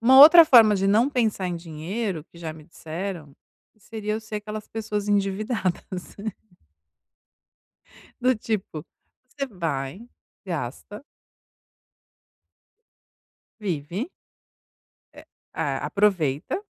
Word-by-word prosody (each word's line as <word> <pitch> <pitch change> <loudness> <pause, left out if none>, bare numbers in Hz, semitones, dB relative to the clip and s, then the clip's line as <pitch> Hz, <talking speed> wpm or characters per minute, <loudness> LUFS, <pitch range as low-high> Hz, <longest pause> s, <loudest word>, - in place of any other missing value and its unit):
uma 260 +3 +6
outra 325 +4 +11
forma 230 -7 +7
de 195 0 0
não 220 +6 +4
pensar 220 -8 0
em 180 - -2
dinheiro 170 +2 -4
que 170 - -18
já 165 -2 -5
me 155 -1 -14
disseram, 165 -2 -7 0.4
seria 215 0 -5
eu 220 - -3
ser 220 -1 -6
aquelas 210 0 -6
pessoas 210 -2 -4
endividadas. 195 -2 -2 2.0
Do 255 +1 +3
tipo, 210 -8 -4 0.4
você 275 +1 -4
vai, 165 - -4 0.4
gasta 175 - -6 2.6
vive 180 - -3 1.1
é - - -12 0.3
é - - -1
aproveita 180 - +1
200 Hz, 95 wpm, -24 LUFS, 170-220 Hz, 2.6 s, outra